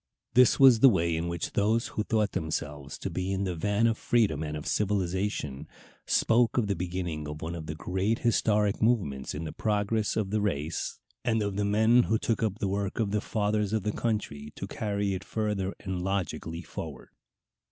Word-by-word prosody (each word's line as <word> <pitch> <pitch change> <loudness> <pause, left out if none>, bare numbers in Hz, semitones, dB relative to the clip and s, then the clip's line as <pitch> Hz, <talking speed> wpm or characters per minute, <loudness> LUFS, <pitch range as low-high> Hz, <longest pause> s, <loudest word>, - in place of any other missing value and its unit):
This 125 +1 +5
was 130 -4 +8
the 135 - +8
way 85 -6 +1
in 80 +1 -2
which 85 -2 -3
those 110 +3 +1
who - - -2
thought 110 -2 +1
themselves 75 -4 -4
to - - -4
be 95 +1 -2
in 95 0 -1
the 95 -2 -1
van 105 +6 +1
of 115 -1 +1
freedom 105 -11 +2
and 75 -1 -3
of 75 - -7
civilization 95 -7 -1 0.4
spoke 120 +1 +3
of 120 - +3
the 100 -1 0
beginning 85 -3 -3
of 75 +1 -6
one 85 +2 -3
of 80 -2 -6
the 75 - -4
great 95 +7 -1
historic 105 -3 +2
movements 95 - +1
in 75 - -4
the 80 - -4
progress 105 0 0
of 105 -3 -1
the 105 0 +1
race, 80 -6 -2 0.3
and 115 -3 +1
of 100 -1 -2
men 105 +4 +4
who 110 -2 +1
took 115 0 -1
up 105 -3 0
the 100 - -1
work 100 +1 -2
of 105 -3 0
the 105 0 +1
fathers 105 -1 0
of 110 -3 0
the 105 - 0
country 105 -11 -2
only 75 - -10
to - - -5
carry 100 -2 -1
it 95 0 -4
further 105 -4 -2
and 95 -2 -3
logically 90 -3 -3
forward. - - -8
100 Hz, 200 wpm, -28 LUFS, 85-110 Hz, 0.4 s, was